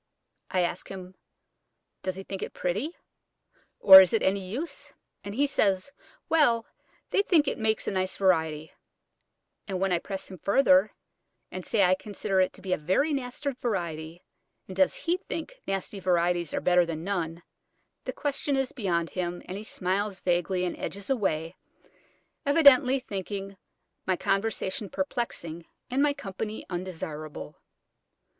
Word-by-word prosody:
I 185 - +1
ask 175 - -2
him, 185 -1 -8 0.9
Does 185 -1 -2
he 190 - -7
think 195 0 -6
it - - -5
pretty, 210 - -2 0.8
or 190 -1 +12
is 185 - +2
it 225 - +2
any 195 +1 +2
use? 285 - -5 0.3
and 200 0 -6
he 280 +4 +3
says, 200 -4 +1 0.4
"Well, 240 -8 +3 0.5
they - - +4
think 325 -7 +3
it - - -1
makes 220 0 0
a - - +1
nice 185 -1 -1
variety;" 160 -5 +1 1.0
and 190 -3 -3
when 195 0 +1
I 175 - +3
press 195 +1 -7
him 185 - -9
further, 200 - +4 0.6
and 185 - -5
say 205 +2 +2
I 180 0 +5
consider 195 0 -1
it 185 - 0
a 190 -1 -1
very 190 - +1
nasty 270 +1 -3
variety, 170 - -4 0.4
and 185 - -9
does 190 0 +3
he 345 +2 0
think 400 +7 -7
nasty 195 +1 -3
varieties 175 -2 +1
are - - -2
better 180 0 +4
than 165 -1 -4
none, 170 -3 -3 0.6
the - - -2
question 285 0 -1
is 270 -1 0
beyond 170 - -1
him, 175 -1 -3
and 185 - -6
he 205 - -6
smiles 195 0 -2
vaguely 180 +1 +1
and 175 - -2
edges 200 +6 -4
away, 170 -8 0 0.9
evidently 280 -3 +6
thinking 195 -3 -5 0.5
my 185 -1 +2
conversation 195 0 -1
perplexing, 170 - -4 0.2
and 265 +2 +2
my 290 -1 +3
company 210 +1 -5
undesirable. 160 -4 -6
190 Hz, 150 wpm, -28 LUFS, 180-230 Hz, 1.0 s, or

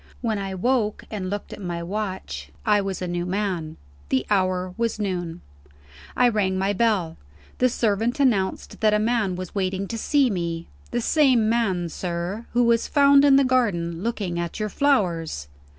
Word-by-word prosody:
When 220 -4 -1
I 195 -1 -4
woke, 220 +1 0
and 195 -4 -3
looked 205 +1 -5
at - - -9
my 175 -2 -4
watch, 185 - -4 0.2
I 210 -1 +4
was 195 -1 -4
a - - -2
new 175 0 -2
man. 180 -4 -2 0.3
The 130 0 +1
hour 185 -2 +1
was 230 -1 -1
noon. 180 -5 -3 0.8
I 250 - +5
rang 200 -5 +1
my 195 +2 +1
bell. 200 -6 +1 0.4
The 255 - +4
servant 230 +2 0
announced 215 -9 0
that 215 -1 +4
a - - +4
man 215 -3 +1
was 185 -1 -6
waiting 190 0 -1
to 230 - -4
see 275 0 +2
me. 170 -3 -3 0.2
"The 240 - -1
same 255 -5 +3
man, 195 -7 +1
sir, 175 +6 -4
who 245 0 +3
was 235 -1 +2
found 280 -1 +5
in 280 -1 +6
the 275 - +6
garden, 185 -10 0
looking 200 -6 -2
at 170 +3 -4
your 215 0 -1
flowers." 175 - 0
200 Hz, 175 wpm, -24 LUFS, 180-230 Hz, 0.8 s, in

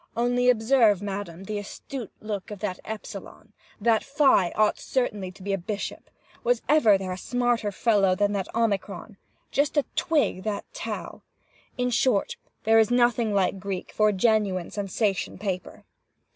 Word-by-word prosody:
Only 245 +1 +2
observe, 225 -3 +4
madam, 195 -3 -5
the 210 +1 -3
astute 230 +3 -7
look 210 -3 -5
of 210 - -6
that 190 -2 -4
Epsilon! 220 -1 -8 0.3
That 225 +1 +3
Phi 275 - +3
ought 215 0 +2
certainly 210 -8 -2
to 190 - -14
be 200 0 -1
a 195 - 0
bishop! 205 +4 -5 0.3
Was 245 -1 +1
ever 265 -9 +5
there 190 -1 -5
a 185 - -4
smarter 240 -1 0
fellow 195 -2 +3
than 205 +1 +1
that 195 -2 -2
Omicron? 205 -2 -1 0.3
Just 285 +2 +1 0.2
twig 295 - +1
that 210 0 -3
Tau! - - -6 0.6
In 250 0 0
short, 235 -4 +1 0.3
there 225 +1 +5
is 220 - +4
nothing 240 -2 +3
like 195 -1 +1
Greek 190 -1 -5
for 215 0 +3
a - - 0
genuine 195 -3 +1
sensation 200 0 -1
paper. 190 -2 -5
210 Hz, 155 wpm, -26 LUFS, 195-240 Hz, 0.6 s, ever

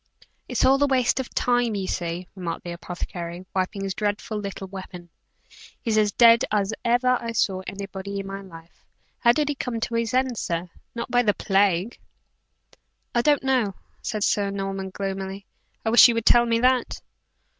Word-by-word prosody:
"It's - - +1
all 270 +1 +4
a - - +4
waste 255 -1 +2
of 260 - -4
time, 245 -3 +1
you 195 -2 -2
see," 175 0 -3
remarked 175 -3 -5
the 175 - -6
apothecary, 175 0 -6
wiping 195 +1 -2
his 195 -1 -2
dreadful 210 +1 -2
little 200 -1 -6
weapon, 185 -2 -9 0.7
"he's 225 -3 -1
as 210 -1 +3
dead 230 +2 +6
as 205 0 +1
ever 245 +1 +2
I 230 -1 -4
saw 190 -4 0
anybody 195 0 -5
in 195 - -5
my 195 0 -6
life! 165 -3 -14 0.4
How 235 - +5
did 295 +4 0
he 290 - 0
come 250 -4 -4
to 235 - -3
his 230 0 0
end, 255 -3 +1
sir 170 +1 -3 0.2
not 235 - -5
by 245 - +4
the 210 -4 +1
plague?" 195 +1 +1 1.1
"I 240 - +3
don't 290 +2 +3
know," 250 -8 +1 0.3
said 215 -3 -2
Sir 200 -1 +1
Norman, 195 -1 -4
gloomily. 195 0 -5 0.4
"I 220 - +1
wish 235 - +9
you 235 - +1
would 230 -1 -2
tell 240 0 +6
me 230 0 +2
that." 255 -1 +2
205 Hz, 180 wpm, -24 LUFS, 190-235 Hz, 1.1 s, wish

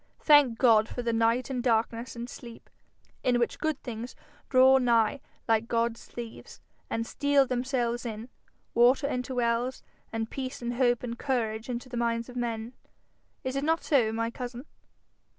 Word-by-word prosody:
Thank 290 -6 +6
God 225 -3 +5
for 245 - -5
the 235 -1 0
night 230 +3 +1
and 250 -2 -1
darkness 230 0 0
and 235 0 -5
sleep, 235 -2 -11 0.5
in 250 -1 +2
which 235 -1 -1
good 310 -3 -1
things 240 0 -6 0.3
draw 260 0 +6
nigh 235 +1 +2 0.3
like 225 0 +2
God's 230 0 -1
thieves, 235 -2 -9 0.3
and 230 0 -2
steal 285 +2 +2
themselves 245 -1 -1
in 225 -1 -6 0.5
water 245 +4 +4
into 255 -1 -2
wells, 240 +1 0 0.3
and 225 0 -2
peace 260 +1 -5
and 240 0 -3
hope 245 -1 +2
and 235 -1 -5
courage 225 -4 -2
into 245 +1 -4
the 245 -1 -6
minds 235 0 -1
of 250 - -11
men. 235 -1 -3 0.7
Is 260 +1 -3
it 275 - -1
not 325 +2 +1
so, 245 -7 +3
my 230 +1 -2
cousin?' 245 +2 -7
240 Hz, 165 wpm, -28 LUFS, 230-255 Hz, 0.7 s, Thank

